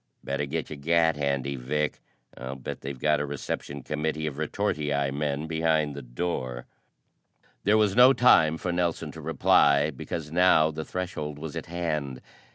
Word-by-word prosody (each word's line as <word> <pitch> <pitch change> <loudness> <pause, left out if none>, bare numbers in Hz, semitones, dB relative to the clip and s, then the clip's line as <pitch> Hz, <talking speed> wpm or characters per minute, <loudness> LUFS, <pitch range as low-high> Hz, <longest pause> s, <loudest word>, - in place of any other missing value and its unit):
"Better 70 +1 -2
get 80 +2 -4
your 75 - -5
gat 80 +2 +2
handy, 70 -1 -1
Vic. 75 +4 -2 0.4
I'll 65 +2 -6
bet 65 - -7
they've 70 0 -6
got 75 +3 +2
a 75 - -1
reception 70 0 -5
committee 75 +1 -2
of 75 -2 -4
retortii 75 -2 -1
men 75 +1 -2
behind 80 -2 +1
the 70 - -7
door." 60 -2 -4 1.0
There 105 +2 +5
was 105 -3 +2
no 125 +2 +8
time 80 -12 +5
for 90 - -3
Nelson 85 -1 -1
to - - -10
reply 70 +1 +3
because 75 +2 -6
now 80 -2 +4
the 80 0 -5
threshold 80 -5 -4
was 80 +1 -7
at 80 - -5
hand. 75 -6 -3
75 Hz, 165 wpm, -27 LUFS, 70-80 Hz, 1.0 s, no